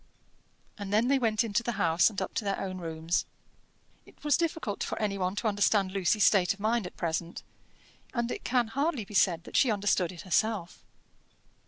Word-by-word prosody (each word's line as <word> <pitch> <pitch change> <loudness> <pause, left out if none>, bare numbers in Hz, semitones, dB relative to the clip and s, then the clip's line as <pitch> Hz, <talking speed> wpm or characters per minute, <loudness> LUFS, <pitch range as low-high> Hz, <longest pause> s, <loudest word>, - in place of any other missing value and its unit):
And 200 -1 -5
then 220 +4 +3
they 275 -1 +3
went 225 -2 +1
into 225 0 0
the 235 0 -3
house 170 -3 +3
and 210 - -5
up - - -6
to - - -2
their 200 -1 -1
own 185 -1 -4
rooms. 165 0 -1 0.8
It - - -20
was 295 -3 +3
difficult 320 -11 -2
for - - -4
any 210 -2 -1
one 185 +1 -1
to 220 - -1
understand 205 -2 +2
Lucy's 195 +2 +1
state 190 -2 +4
of - - -26
mind 220 -1 0
at - - -13
present, 170 0 -3 0.7
and 235 -1 -2
it - - -5
can 240 -2 +1
hardly 275 -2 -1
be 210 - -13
said 175 -4 +3
that - - -11
she 265 - +4
understood 200 -4 +1
it 175 - -10
herself. 190 0 -1
205 Hz, 195 wpm, -29 LUFS, 185-230 Hz, 0.8 s, state